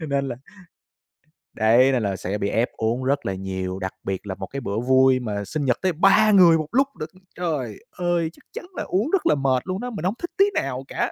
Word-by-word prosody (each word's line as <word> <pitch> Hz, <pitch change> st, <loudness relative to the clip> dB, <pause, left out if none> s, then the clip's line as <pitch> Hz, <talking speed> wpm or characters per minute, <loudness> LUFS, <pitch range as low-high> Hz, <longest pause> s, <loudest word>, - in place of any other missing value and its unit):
Cho 160 Hz, -, -5 dB
nên 140 Hz, -1 st, -1 dB
là 120 Hz, -, -4 dB, 1.2 s
Đấy, 120 Hz, +5 st, +4 dB
nên 125 Hz, -4 st, 0 dB
là 100 Hz, -1 st, -1 dB
sẽ 95 Hz, +2 st, -3 dB
bị 100 Hz, -1 st, -1 dB
ép 115 Hz, +2 st, +1 dB
uống 115 Hz, +3 st, -1 dB
rất 140 Hz, +2 st, 0 dB
là 95 Hz, -, -1 dB
nhiều, 95 Hz, 0 st, -4 dB
đặc 95 Hz, 0 st, -4 dB
biệt 95 Hz, +1 st, -4 dB
là 95 Hz, -, -4 dB
một 95 Hz, 0 st, -7 dB
cái 140 Hz, -, -6 dB
bữa 105 Hz, -3 st, -2 dB
vui 130 Hz, +1 st, +4 dB
mà 105 Hz, -4 st, -4 dB
sinh 145 Hz, +8 st, -3 dB
nhật 125 Hz, -2 st, +2 dB
tới 185 Hz, -1 st, +1 dB
3 195 Hz, +6 st, +5 dB
người 175 Hz, -5 st, +7 dB
một 155 Hz, -1 st, -3 dB
lúc 270 Hz, +3 st, +3 dB
lận! 155 Hz, -, -5 dB, 0.3 s
Trời 150 Hz, -, -3 dB, 0.2 s
ơi, 175 Hz, -2 st, 0 dB
chắc -, -, -21 dB
chắn -, -, -7 dB
là -, -, -2 dB
uống 205 Hz, +10 st, 0 dB
rất 390 Hz, -, +1 dB
là 150 Hz, -, +4 dB
mệt 130 Hz, -2 st, +1 dB
luôn 185 Hz, +1 st, -2 dB
đó, 250 Hz, +2 st, -4 dB
mình 205 Hz, -8 st, -5 dB
hổng 190 Hz, -, +1 dB
thích 345 Hz, -, -5 dB
tí 395 Hz, -, +6 dB
nào 130 Hz, -1 st, -2 dB
cả. -, -, -2 dB
135 Hz, 250 wpm, -23 LUFS, 110-175 Hz, 1.2 s, người